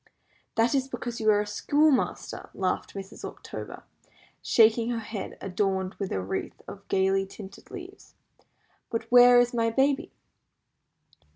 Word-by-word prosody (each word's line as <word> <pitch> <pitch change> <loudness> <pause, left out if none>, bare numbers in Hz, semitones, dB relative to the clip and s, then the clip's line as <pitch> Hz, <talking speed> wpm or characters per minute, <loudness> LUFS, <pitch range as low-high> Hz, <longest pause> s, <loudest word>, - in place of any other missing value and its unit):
"That 230 +3 +3
is 270 -1 +1
because 240 -3 -5
you 215 - +3
are 205 -1 +4
a - - -3
schoolmaster," 285 +7 0
laughed 185 +1 -2
Mrs. 195 -1 -8
October, - - -8 0.6
shaking 230 +1 +4
her 240 - -1
head, 220 -2 -6
adorned 190 0 -1
with 195 -2 -3
a - - -1
wreath 95 - -4
of - - -10
gaily 195 0 +1
tinted 195 0 -12
leaves; 385 +1 -11 0.7
"but 230 0 -2
where 245 0 +8
is 245 +1 +2
my 230 -1 +1
baby?" 270 +4 +1
225 Hz, 135 wpm, -27 LUFS, 195-245 Hz, 0.7 s, where